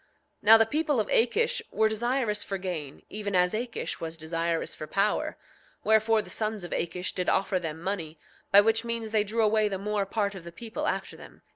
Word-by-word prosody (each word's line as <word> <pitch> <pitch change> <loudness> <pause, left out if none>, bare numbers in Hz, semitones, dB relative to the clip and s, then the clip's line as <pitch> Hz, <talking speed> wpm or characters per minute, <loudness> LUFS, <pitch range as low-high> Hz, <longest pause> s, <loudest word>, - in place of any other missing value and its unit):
9:11 - - -37 0.3
Now 220 +1 +9
the 225 - +4
people 295 +2 0
of 210 - 0
Akish 465 - +2
were 220 - +2
desirous 230 0 0
for 195 - -3
gain, 170 -7 -6
even 205 -2 -3
as 180 +1 +3
Akish 235 +2 -3
was 165 0 -5
desirous 165 +1 -2
for 155 - -7
power; 200 +4 0 0.5
wherefore, 220 0 +3
the - - -9
sons 215 -3 -2
of 175 - -7
Akish 180 +2 -2
did 180 -1 -1
offer 190 -1 +1
them 160 -2 -5
money, 170 -3 -4 0.3
by 200 0 +9
which 225 +2 +2
means 230 -2 -3
they 215 -1 +3
drew 220 +2 0
away 215 0 +3
the 195 - -2
more 205 0 -1
part 200 -1 -1
of 190 -3 -9
the 170 - -9
people 225 +5 -5
after - - -2
them. - - -14
210 Hz, 210 wpm, -28 LUFS, 180-225 Hz, 0.5 s, Now